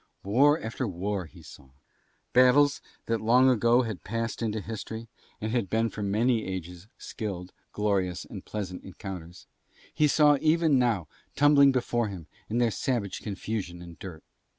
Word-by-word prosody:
War 140 Hz, +10 st, +4 dB
after 115 Hz, +3 st, -3 dB
war 95 Hz, 0 st, -3 dB
he 85 Hz, +1 st, -16 dB
saw. 70 Hz, -2 st, -14 dB, 0.6 s
Battles 140 Hz, +3 st, +5 dB, 0.2 s
that 115 Hz, -1 st, -1 dB
long 125 Hz, +4 st, +5 dB
ago 120 Hz, +1 st, +3 dB
had 105 Hz, -9 st, -5 dB
passed 115 Hz, +1 st, -3 dB
into 110 Hz, -1 st, -1 dB
history 110 Hz, +2 st, -7 dB, 0.3 s
and 110 Hz, +1 st, -3 dB
had 115 Hz, -6 st, 0 dB
been 115 Hz, +2 st, +1 dB
for 105 Hz, -, -6 dB
many 110 Hz, +3 st, +1 dB
ages 90 Hz, 0 st, -6 dB
skilled, 95 Hz, -6 st, -6 dB, 0.2 s
glorious 95 Hz, -4 st, -1 dB
and -, -, -9 dB
pleasant 95 Hz, -4 st, -5 dB
encounters 90 Hz, -3 st, -9 dB, 0.5 s
he 150 Hz, -, +3 dB
saw 145 Hz, -1 st, +4 dB
even 160 Hz, -3 st, +3 dB
now 115 Hz, -10 st, +1 dB, 0.3 s
tumbling 140 Hz, -1 st, +6 dB
before 120 Hz, -3 st, 0 dB
him 95 Hz, -5 st, -7 dB, 0.2 s
in 115 Hz, -, -1 dB
their 120 Hz, -2 st, +3 dB
savage 105 Hz, -6 st, -2 dB
confusion 100 Hz, -3 st, -4 dB
and 85 Hz, -1 st, -12 dB
dirt. 90 Hz, -5 st, -9 dB
110 Hz, 150 wpm, -28 LUFS, 95-125 Hz, 0.6 s, tumbling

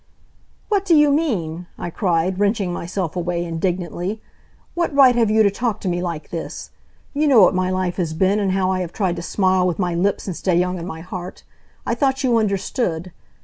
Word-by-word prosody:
"What 405 Hz, -3 st, +1 dB
do 355 Hz, -4 st, +4 dB
you 295 Hz, -1 st, +5 dB
mean!" 180 Hz, -, -1 dB
I 175 Hz, -, -5 dB
cried, 180 Hz, 0 st, 0 dB
wrenching 200 Hz, -3 st, +1 dB
myself 175 Hz, -1 st, -3 dB
away 175 Hz, -1 st, -2 dB
indignantly. 175 Hz, +3 st, -2 dB, 0.5 s
"What 345 Hz, -1 st, 0 dB
right 265 Hz, -3 st, +7 dB
have 230 Hz, -3 st, +3 dB
you 220 Hz, +1 st, +4 dB
to 200 Hz, -, +3 dB
talk 225 Hz, +1 st, -2 dB
to -, -, -4 dB
me 175 Hz, 0 st, 0 dB
like 170 Hz, -4 st, -5 dB
this? 165 Hz, -2 st, -6 dB, 0.4 s
You 300 Hz, +1 st, +1 dB
know 245 Hz, -8 st, +7 dB
what 180 Hz, -, +5 dB
my 185 Hz, 0 st, 0 dB
life 185 Hz, -1 st, -1 dB
has 165 Hz, -4 st, -2 dB
been, 190 Hz, +4 st, +2 dB
and 195 Hz, -2 st, 0 dB
how 190 Hz, -1 st, +1 dB
I 185 Hz, -, 0 dB
have 175 Hz, -2 st, -4 dB
tried 185 Hz, -5 st, 0 dB
to -, -, -4 dB
smile 185 Hz, +1 st, +1 dB
with 175 Hz, -, -1 dB
my 180 Hz, -3 st, -1 dB
lips 190 Hz, +4 st, 0 dB
and 185 Hz, -, -4 dB
stay 185 Hz, 0 st, 0 dB
young 180 Hz, 0 st, 0 dB
in 170 Hz, -, -6 dB
my 160 Hz, -4 st, -7 dB
heart! 180 Hz, +1 st, -8 dB, 0.4 s
I -, -, 0 dB
thought 270 Hz, -1 st, 0 dB
you 245 Hz, -3 st, +3 dB
understood. 195 Hz, -4 st, -1 dB
185 Hz, 210 wpm, -21 LUFS, 175-215 Hz, 0.5 s, right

